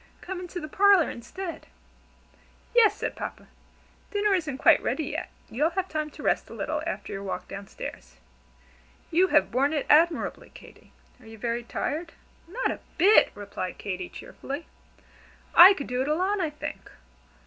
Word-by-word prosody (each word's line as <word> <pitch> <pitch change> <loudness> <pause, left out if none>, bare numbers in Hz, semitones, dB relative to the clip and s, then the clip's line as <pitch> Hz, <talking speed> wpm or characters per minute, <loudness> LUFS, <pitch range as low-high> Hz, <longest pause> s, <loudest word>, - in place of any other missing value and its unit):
Come 375 0 -5
into 360 0 -6
the 310 - -6
parlor 390 0 +4
instead." 335 +10 -7 1.1
"Yes!" 465 -3 +5
said - - -3
Papa, - - -7 0.6
"dinner 410 -1 +1
isn't 310 -8 -1
quite - - +5
ready 315 - -1
yet, - - -4 0.2
you'll 295 +8 +1
have 370 +2 -2
time 310 -1 -2
to - - -12
rest - - 0
a - - -9
little - - -2
after - - -4
your 195 - -5
walk 185 -2 -5
down 195 0 -8
stairs. - - -9 1.0
You 360 +3 +4
have 295 -4 +3
borne 275 +5 +2
it 295 - -1
admirably, 325 +2 +3
Katy. - - -16 0.3
Are 235 - -17
you 225 0 -11
very 235 +2 -2
tired?" 320 +7 -4 0.3
"Not 465 +9 -1
a - - -6 0.2
bit!" 395 +6 +6
replied 200 -2 -6
Katy, 185 -2 -5
cheerfully. 285 +4 -7 0.9
"I 370 +3 +10
could 280 - -5
do 250 +1 -2
it 265 - -1
alone, 370 +6 +1
I 330 - 0
think. 300 - -7
310 Hz, 165 wpm, -26 LUFS, 250-370 Hz, 1.1 s, I